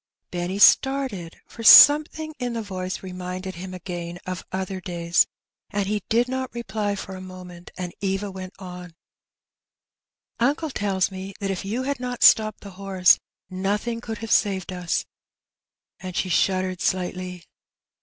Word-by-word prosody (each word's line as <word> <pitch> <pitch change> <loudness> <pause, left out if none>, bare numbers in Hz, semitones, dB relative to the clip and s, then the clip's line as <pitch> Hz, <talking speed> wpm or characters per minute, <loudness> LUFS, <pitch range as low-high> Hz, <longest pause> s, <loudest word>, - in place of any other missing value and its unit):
Benny 175 +2 -3
started, 235 -7 +3
for 230 - -11
something 305 +5 +8
in 245 -1 -2
the 230 -1 -3
voice 185 -2 -5
reminded 185 0 -6
him 185 +1 -8
again 175 -1 -6
of 185 0 -5
other 190 0 -4
days, 170 -2 +1 0.4
and 200 -1 -1
he 205 +1 -1
did 235 +2 +3
not 260 0 -3
reply 215 -3 -2
for 190 -1 -7
a 185 - -8
moment; 180 -1 -11
and 180 -2 -5
Eva 195 +1 -2
went 185 0 -8
on 180 -2 -10 0.4
— - - -69
*' - - -57
Uncle 290 +6 +1
tells 195 -4 0
me 190 0 -7
that 195 -1 -2
if 190 - -4
you 230 +6 -2
had 280 -1 -2
not 250 -1 -3
stopped 215 -1 +5
the 200 - -10
horse, 190 -2 +4 0.3
nothing 205 +5 -2
could 225 -2 -5
have 225 - -7
saved 190 -2 +1
us;^' 180 -2 -2 0.9
and 185 -1 -7
she 185 - -1
shuddered 185 +1 +1
slightly. 180 -1 -2
190 Hz, 155 wpm, -24 LUFS, 185-215 Hz, 0.9 s, something